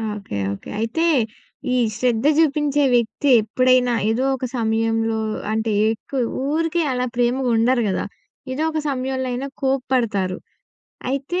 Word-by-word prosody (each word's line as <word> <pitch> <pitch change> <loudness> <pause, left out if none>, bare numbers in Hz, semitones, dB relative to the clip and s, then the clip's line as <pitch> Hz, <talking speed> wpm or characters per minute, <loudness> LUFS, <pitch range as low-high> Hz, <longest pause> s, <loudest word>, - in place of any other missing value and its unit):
Okay. 200 - -7 0.2
Okay. 100 - -10
అయితే 230 +9 -1 0.7
ఈ - - +2 0.2
శ్రద్ధ 245 -1 +1
చూపించే 295 -2 +2
వ్యక్తి 240 +4 0
ఎప్పుడైనా 250 +3 +3 0.2
ఏదో 230 +4 +1
ఒక 260 - -4
సమయంలో 225 0 0 0.3
అంటే 220 0 0 0.2
ఎక్కువ 260 +4 -5 0.3
ఊరికే 330 +1 +1
అలా 250 0 0
ప్రేమగా 245 +1 +1
ఉండరు 240 +2 +3
గదా! 190 - -1 0.5
ఏదో 280 +4 -1
ఒక 315 - -1
సమయంలో 260 -1 -2
అయినా 255 +3 -3
కోప్పడతారు. 245 -8 0 0.7
అయితే 275 +7 -2
250 Hz, 125 wpm, -21 LUFS, 225-270 Hz, 0.7 s, ఎప్పుడైనా